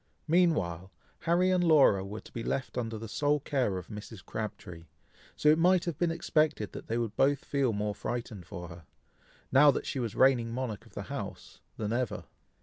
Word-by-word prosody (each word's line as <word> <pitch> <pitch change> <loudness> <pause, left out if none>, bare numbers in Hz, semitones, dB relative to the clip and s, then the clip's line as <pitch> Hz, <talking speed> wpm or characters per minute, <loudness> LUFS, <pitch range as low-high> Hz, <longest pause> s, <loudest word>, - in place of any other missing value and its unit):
Meanwhile, 100 - +2 0.3
Harry 175 +2 +2
and 180 -1 +3
Laura 145 - +5
were 105 +3 -7
to - - -15
be 115 - -5
left 130 +3 -3
under 115 -3 -3
the 115 +1 -7
sole 145 +6 +1
care 130 -9 0
of 90 - -8
Mrs. 105 -2 -9
Crabtree, 90 -6 -6 0.5
so - - 0
it 155 +2 +5
might 180 +1 +4
have 170 -3 -4
been 175 - +2
expected 155 -8 0
that - - -9
they 115 - -1
would 115 -3 -2
both 140 +1 +2
feel 140 -4 +1
more 105 0 -2
frightened 110 -5 -5
for 85 +2 -7
her, 85 -1 -12 0.7
now 145 +3 +7
that 140 - +1
she 135 - -3
was 115 -4 -3
reigning 125 -3 +4
monarch 120 -4 -4
of - - -22
the - - -4
house, - - -7 0.2
than 105 0 -2
ever. 125 -2 -2
120 Hz, 195 wpm, -30 LUFS, 105-150 Hz, 0.7 s, now